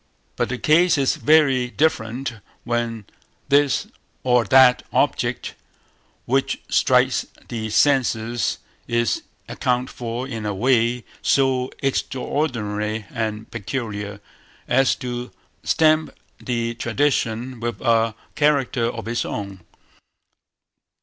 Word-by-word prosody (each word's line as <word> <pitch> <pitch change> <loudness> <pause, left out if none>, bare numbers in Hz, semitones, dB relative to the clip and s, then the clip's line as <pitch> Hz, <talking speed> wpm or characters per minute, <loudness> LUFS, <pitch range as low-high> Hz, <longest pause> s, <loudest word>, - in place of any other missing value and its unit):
But - - -1
the 125 - -2
case 165 +5 +4
is 135 -2 +2
very 135 -5 +3
different 120 -4 -1 0.3
when 115 -2 -2 0.4
this 140 -1 +3 0.4
or 125 -2 +3
that 130 -2 +6
object - - 0 0.7
which 135 +2 0
strikes - - +3 0.2
the 110 -2 -4
senses 120 -2 +1 0.3
is 120 -1 0 0.3
accounted 125 0 -1
for 120 +2 -4
in 115 -5 -5
a 105 -1 -2
way 120 +1 +2 0.2
so 130 -2 +2
extraordinary 115 -6 -2
and 110 -2 -4
peculiar, 105 -3 -4 0.5
as 130 +2 +3
to 125 -1 -5 0.3
stamp 155 -1 +3 0.3
the 115 -1 -2
tradition 120 -1 -1
with 120 0 -3
a 115 -2 +2 0.2
character 140 -4 +2
of 115 -1 -4
its 120 +1 -1
own. 100 -2 -5
120 Hz, 105 wpm, -22 LUFS, 115-135 Hz, 0.7 s, that